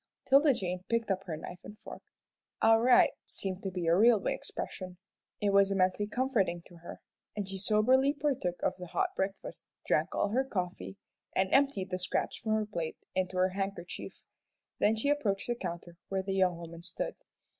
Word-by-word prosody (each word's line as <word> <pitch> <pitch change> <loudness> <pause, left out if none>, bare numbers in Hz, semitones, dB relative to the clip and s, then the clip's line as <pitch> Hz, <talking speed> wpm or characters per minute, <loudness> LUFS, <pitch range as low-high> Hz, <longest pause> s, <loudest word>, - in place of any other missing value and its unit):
'Tilda 280 +2 +6
Jane 180 -6 -3
picked 230 -3 +1
up 195 0 -1
her 160 -4 -4
knife 175 +3 -8
and 210 - -10
fork. - - -10 0.6
"All 225 0 +5
right!" 250 +1 +6
seemed 190 -1 -4
to 195 - -3
be 180 -2 -3
a 165 +1 +4
railway 220 +1 +4
expression. 185 -1 -6 0.4
It 205 -1 +1
was 200 0 +5
immensely 190 +1 +2
comforting 210 -8 0
to 175 - -15
her, 170 - -10 0.3
and 205 -2 -3
she 195 0 -5
soberly 240 +7 +4
partook 275 -11 -1
of - - +1
the 180 -1 -8
hot - - 0
breakfast, 195 +1 -4 0.2
drank - - +1
all - - +1
her 255 +6 +2
coffee, 190 -5 -4 0.4
and 190 0 +1
emptied 270 -9 +2
the 185 - -1
scraps 180 - -1
from 220 -1 -2
her 215 0 +1
plate 170 -7 -4 0.2
into 185 0 -1
her 185 +1 +3
handkerchief. 195 -2 -5 0.6
Then 215 - +4
she 220 +6 0
approached 220 -10 0
the 240 - 0
counter 175 -5 -6
where 190 -1 -1
the 195 0 -2
young 185 -2 +2
woman 170 0 -9
stood. 175 +1 -4
195 Hz, 185 wpm, -31 LUFS, 180-225 Hz, 0.6 s, Tilda